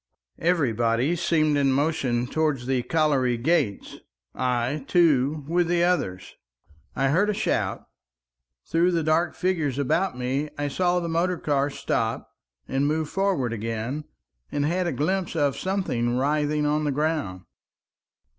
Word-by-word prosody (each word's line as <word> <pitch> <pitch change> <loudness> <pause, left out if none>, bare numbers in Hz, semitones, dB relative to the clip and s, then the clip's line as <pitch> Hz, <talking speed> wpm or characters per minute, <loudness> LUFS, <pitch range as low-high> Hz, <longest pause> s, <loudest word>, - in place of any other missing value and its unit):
Everybody 130 -4 +1
seemed 155 -3 +2
in 135 -1 +3
motion 135 -4 0
towards 145 -2 -1
the 130 -1 +1
colliery 135 -5 +1
gates, 135 -5 0 0.4
I, 125 +3 -1
too, 150 -4 +2
with 175 +1 +1
the 175 0 +2
others. 100 - -1 0.6
I 135 0 +1
heard 185 +9 +2
a 210 - 0
shout. - - -1 0.8
Through 175 +2 +2
the 165 -1 +1
dark 160 +2 +1
figures 160 -8 -1
about 140 +3 0
me 135 +4 -2
I 145 0 -1
saw 180 +4 +1
the 170 - -3
motor 170 +2 0
car 145 -2 0
stop - - -2 0.4
and 135 +2 0
move 155 0 -1
forward 190 -12 0
again, 115 +6 -4 0.5
and 145 0 0
had 175 +3 0
a - - 0
glimpse 180 +4 -1
of 145 -4 +1
something 125 -12 -1
writhing 150 +2 +1
on 150 +1 +1
the 145 - 0
ground. 145 - -1
150 Hz, 140 wpm, -25 LUFS, 130-170 Hz, 0.8 s, in